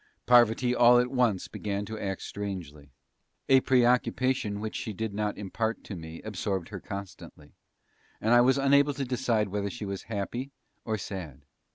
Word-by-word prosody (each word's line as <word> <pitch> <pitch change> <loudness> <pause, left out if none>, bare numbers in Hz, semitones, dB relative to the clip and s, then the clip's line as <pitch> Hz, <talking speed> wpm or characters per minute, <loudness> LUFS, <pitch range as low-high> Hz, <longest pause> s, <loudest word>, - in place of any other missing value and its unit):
Parvati 120 0 +5
all 120 0 +6
at 125 +1 +2
once 120 -7 +1
began 100 0 -4
to 110 +1 -6
act 95 -1 -4
strangely. 85 -8 -6 0.6
A 135 0 +6
preoccupation 125 -3 +2
which 110 +1 -5
she 110 - -4
did 110 +1 -4
not 105 0 -2
impart 110 +3 -3
to 100 - -7
me 80 -1 -9
absorbed 100 -4 -3
her 100 -2 -6
constantly, 95 -6 -9 0.7
and 110 +2 +2
I 120 - +7
was 130 +3 +4
unable 140 +1 +4
to 140 -1 -2
decide 120 -4 0
whether 100 +1 -2
she 105 0 -6
was 100 -1 -4
happy, 115 +5 -3 0.4
or 110 -1 -1
sad. 85 -9 -7
110 Hz, 165 wpm, -28 LUFS, 100-125 Hz, 0.7 s, I